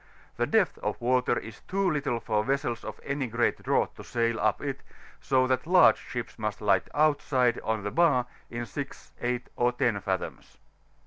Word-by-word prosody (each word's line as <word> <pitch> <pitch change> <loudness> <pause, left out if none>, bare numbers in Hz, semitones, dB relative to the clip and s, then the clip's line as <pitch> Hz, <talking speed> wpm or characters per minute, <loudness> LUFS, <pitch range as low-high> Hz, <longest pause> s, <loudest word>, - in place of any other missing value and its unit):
The - - +1
depth - - +2
of - - -3
water 125 +1 +2
is 115 -2 -8
too 195 +1 +1
little 145 -7 0
for 105 -2 0
vessels 135 -2 -1
of - - -7
any 140 -2 -2
great 115 +1 0
draught - - 0
to - - -8
sfidl 115 -1 -1
up - - +2
it, - - -4 0.4
so 130 -1 +2
that 130 +3 0
large 180 +1 +6
ships 120 -1 -6
must 105 -1 -2
lie 100 -3 +3
outside 140 -5 +2
of 110 -2 -2
the 105 - -3
bar 150 -8 +3 0.2
in 120 0 -4
6, 140 +2 -7
8, 125 0 -1
or 120 0 +2
10 120 -4 0
fathoms. 95 -1 -4
125 Hz, 180 wpm, -28 LUFS, 115-140 Hz, 0.4 s, large